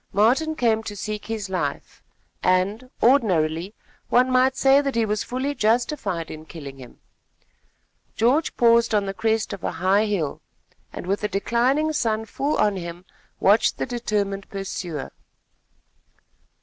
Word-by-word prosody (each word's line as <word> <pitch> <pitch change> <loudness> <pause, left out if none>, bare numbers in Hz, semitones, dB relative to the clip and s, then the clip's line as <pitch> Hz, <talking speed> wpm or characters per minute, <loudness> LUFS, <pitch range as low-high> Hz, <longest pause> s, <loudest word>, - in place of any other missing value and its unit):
Martin 255 +11 +3
came 225 -5 +2
to 210 -2 -7
seek 210 +1 -5
his 220 -3 -3
life, 180 -7 -4 0.4
and, 200 +7 +1
ordinarily, 185 - +2 0.3
one 255 +1 +4
might 260 +1 +3
say 270 +1 +5
that 275 -3 -2
he 230 -1 +2
was 210 0 -1
fully 260 +3 -2
justified 230 - 0
in 155 0 -8
killing 145 -4 -10
him. 125 -2 -13 1.2
George 260 +8 +1
paused 235 -1 +4
on 205 -1 +2
the 195 - -3
crest 220 0 0
of 195 - -8
a - - -2
high 190 +5 +2
hill, 170 -9 -2 0.5
and - - -7
with 195 +2 -1
the 210 - 0
declining 250 +10 +1
sun 225 -5 0
full 280 +7 -2
on 205 -2 +2
him, 175 0 -7 0.3
watched 205 +3 +3
the - - -1
determined 205 -5 -2
pursuer. 180 -6 -5
215 Hz, 145 wpm, -23 LUFS, 190-245 Hz, 1.2 s, say